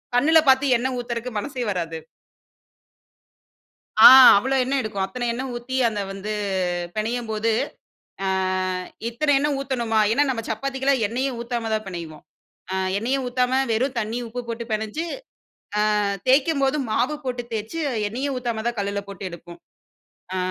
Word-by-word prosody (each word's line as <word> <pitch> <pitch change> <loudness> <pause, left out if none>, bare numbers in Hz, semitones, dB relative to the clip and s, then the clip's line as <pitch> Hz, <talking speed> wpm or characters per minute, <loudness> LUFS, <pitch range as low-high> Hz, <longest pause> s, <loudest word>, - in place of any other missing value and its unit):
கண்ணுல 315 +6 +5
பாத்து 265 0 +4
எண்ணெய் 255 +2 -2
ஊத்துறக்கு 240 0 -4
மனசே 255 +2 -4
வராது. 165 -3 -3 2.1
ஆ, - - +15 0.3
அவ்வளோ 265 +6 0
எண்ணெய் 270 +1 0
எடுக்கும். 205 -3 -3
அத்தனை 240 +6 -5
எண்ணெய் 260 +2 -4
ஊத்தி, 245 +2 -4
அந்த 210 -2 -3
வந்து 195 +2 -5 0.6
பிணையும் 230 +2 -2
போது, 220 +1 0 0.7
ஆ - - 0 0.8
இத்தனை 285 +5 0
எண்ணெய் 290 -1 0
ஊத்தணுமா? 235 -5 -1
ஏன்னா, 285 +5 +3
நம்ம 245 -3 -1
சப்பாத்திக்குலாம் 265 +1 0
எண்ணயே 260 +5 -1
ஊத்தாம 235 -1 -3
தான் 215 -1 -4
பெனைவோம். 165 -4 -8 0.5
அ - - 0 0.2
எண்ணயும் 260 +5 -1
ஊத்தாம, 250 0 0 0.2
வெறும் 255 +4 0
தண்ணீயும் 230 +2 -3
உப்பு 245 +2 -5
போட்டு 230 0 -4
பெனஞ்சு, 220 +10 -2 1.0
ஆ - - 0 0.2
தேய்க்கும்போது 275 +1 +3
மாவு 245 +7 +1
போட்டு 245 -1 -3
தேய்ச்சு 220 +9 -4 0.3
எண்ணயும் 265 +4 -3
ஊத்தாம 235 -3 -3
தான் 240 -1 -2
கல்லுல 200 0 -2
போட்டு 195 -1 -9
எடுப்போம். 170 0 -11 0.7
அ - - -2
240 Hz, 140 wpm, -23 LUFS, 215-265 Hz, 2.1 s, ஆ